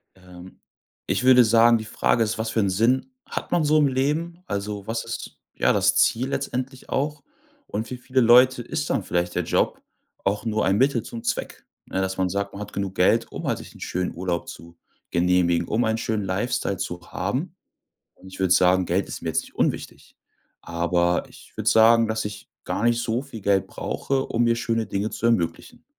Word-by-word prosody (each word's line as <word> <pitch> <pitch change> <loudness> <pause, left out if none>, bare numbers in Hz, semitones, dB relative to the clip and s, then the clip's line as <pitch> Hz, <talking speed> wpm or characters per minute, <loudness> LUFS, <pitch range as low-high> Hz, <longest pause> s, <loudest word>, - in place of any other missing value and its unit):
Ähm, 90 0 -14 0.5
ich - - 0
würde 125 -1 +7
sagen, 115 +1 +5
die 110 - -6
Frage 115 +1 +1
ist: 110 0 -2
Was 110 0 -2
für 115 - 0
'n 100 -2 +2
Sinn 120 - +1
hat - - -6
man 170 -3 +2
so 155 +1 +3
im 145 -2 +4
Leben? 155 +7 -1
Also 100 0 -4
was 115 0 -2
ist, 115 - -7 0.2
ja, - - +2
das - - +3
Ziel 125 +3 +3
letztendlich 130 -1 -4
auch 145 +1 -2 0.4
und 110 +2 -4
für 125 - -6
viele 130 +1 0
Leute 125 +2 +6
ist 145 +4 -4
dann 100 - 0
vielleicht 90 0 -1
der 90 - 0
Job - - 0 0.4
auch 100 +3 0
nur 110 -1 0
ein 95 +1 +2
Mittel 130 -2 +2
zum 115 - -8
Zweck, - - -3 0.2
ne? 95 - -2
Dass 95 0 -2
man 95 -1 +1
sagt, 100 +1 -3
man 100 - -7
hat 105 - -8
genug 100 -1 -3
Geld, 115 +5 +2
um - - -5
halt - - 0
sich - - -12
'n - - -14
schönen 90 0 -3
Urlaub 85 -1 -3
zu 85 0 -12 0.3
genehmigen, 85 -1 +2
um 115 +3 +1
einen 110 0 +1
schönen 110 -2 -2
Lifestyle 100 +1 -1
zu 90 -2 -4
haben. 135 - -3 0.6
Und 95 - -15
ich 95 - -11
würd 95 -1 +3
sagen, 90 0 +4
Geld 95 +4 0
ist - - -6
mir - - -3
jetzt - - +1
nicht - - -16
unwichtig, - - -3 0.4
aber 85 +1 0
ich - - -17
würd - - -5
sagen, 115 +1 +6
dass 110 -1 -1
ich 105 -1 -7 0.2
gar 110 - -2
nicht 120 0 +2
so 115 +1 -1
viel 135 -6 -10
Geld 100 -1 +2
brauche, 135 -1 -2
um 120 +1 +1
mir 115 0 +2
schöne 115 -2 -1
Dinge 100 +2 -2
zu 115 - -2
ermöglichen. 90 -8 -1
110 Hz, 205 wpm, -24 LUFS, 95-125 Hz, 0.6 s, würde